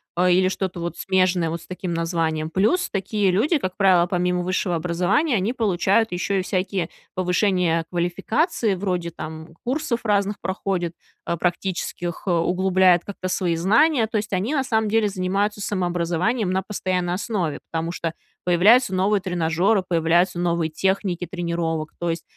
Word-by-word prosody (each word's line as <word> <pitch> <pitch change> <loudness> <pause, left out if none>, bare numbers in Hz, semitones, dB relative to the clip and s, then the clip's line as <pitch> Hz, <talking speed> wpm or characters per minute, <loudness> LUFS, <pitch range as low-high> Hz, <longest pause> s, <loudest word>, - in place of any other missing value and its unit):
а, 180 +1 +3
или 185 +1 +4
что-то 185 -1 -3
вот 170 0 -4
смежное 185 -3 +1
вот 170 0 -4
с - - -16
таким 180 -1 -4
названием. 165 -2 -1
Плюс 215 - +1
такие 200 0 0
люди, 255 - +2
как 185 -7 -4
правило, 185 -3 +4
помимо 180 0 0
высшего 180 0 -1
образования, 180 - +1
они 205 +4 0
получают 215 -1 +1
ещё 190 +2 -1
и - - +1
всякие 185 -1 -2 0.2
повышения 180 -2 +1
квалификации 195 - 0
вроде, 180 -3 -2
там, 160 0 -8
курсов 260 -1 -2
разных 205 -2 +1
проходят, 185 -2 -2 0.3
а, 170 - -1
практических, 175 -1 -3
углубляют 180 0 +3
как-то 190 -2 -5
свои 180 -2 0
знания. 225 - +3
То 220 - -2
есть 210 0 -3
они 205 +11 0
на 270 - +1
самом 220 -4 0
деле 220 -1 +2
занимаются 200 +2 -1
самообразованием 180 +3 0
на 190 +1 0
постоянной 185 -3 -2
основе, 185 -5 -2
потому 165 0 -2
что 165 -2 -3 0.3
появляются 195 +7 +5
новые 195 +2 +2
тренажеры, 180 +3 +1
появляются 170 +1 +2
новые 170 -2 0
техники 185 +1 -1
тренировок. 170 -3 -2
То 175 - -1
есть 165 - -5
185 Hz, 155 wpm, -23 LUFS, 175-200 Hz, 0.3 s, появляются